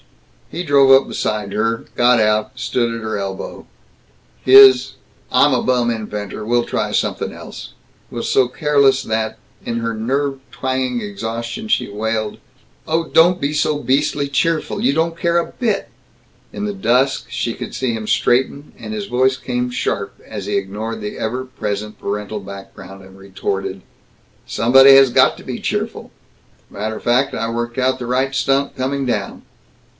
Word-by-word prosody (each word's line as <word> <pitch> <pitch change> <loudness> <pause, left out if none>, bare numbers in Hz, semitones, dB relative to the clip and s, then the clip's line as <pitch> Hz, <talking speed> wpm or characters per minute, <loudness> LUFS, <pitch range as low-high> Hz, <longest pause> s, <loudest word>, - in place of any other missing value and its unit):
He 175 - -4
drove 140 -4 +5
up 135 0 +6
beside 105 -2 -3
her, 115 +2 -1
got 120 0 +4
out, 110 +2 +1
stood 120 -1 0
at 115 - -5
her 110 -1 -2
elbow. 95 -1 -6 0.8
His 130 0 +8 0.4
"I'm - - +4
a - - +1
bum 125 -2 +1
inventor. 105 -2 -5
We'll 120 +2 +1
try - - -2
somethin' - - -1
else" - - -10 0.4
was - - -4
so 130 -2 +3
careless 140 -2 +2
that, 110 0 -2 0.3
in 115 -1 -3
her 115 0 -2
nerve 135 +5 -1
twanging 130 -2 -2
exhaustion 115 - -5
she - - +1
wailed, 110 +1 -3 0.5
"Oh, 165 +1 0
don't 175 +2 +4
be 140 +2 -1
so 150 0 +1
beastly 145 +1 0
cheerful! 155 +3 -1
You - - +3
don't 165 +3 0
care 170 0 +1
a 170 - +2
bit!" 220 -6 -1 0.6
In 205 - -4
the 205 - -2
dusk 135 -7 +1
she - - -2
could - - -7
see 130 -3 -1
him 110 -1 -5
straighten, 135 +6 +1
and 220 - -7
his 210 -2 -4
voice 130 -4 +1
came 125 -1 -2
sharp 100 -5 -3
as 100 -3 -6
he 105 - 0
ignored 110 +4 -4
the 105 -1 -6
ever 125 +4 -3
present 105 -4 -5
parental 105 +1 -4
background 95 -1 -11
and 95 0 -16
retorted, 95 0 -4 0.6
"Somebody 135 +4 +6
has 135 -2 +6
got - - +4
to - - -12
be - - -5
cheerful. - - -3 0.6
Matter 110 +2 -4
fact, 125 +3 +1
I 115 0 -2
worked 120 +1 -4
out 130 0 +1
the 125 - -5
right 130 +2 0
stunt, 135 +1 +1
coming 135 +1 -2
down." 105 -5 -3
125 Hz, 160 wpm, -19 LUFS, 110-135 Hz, 0.8 s, His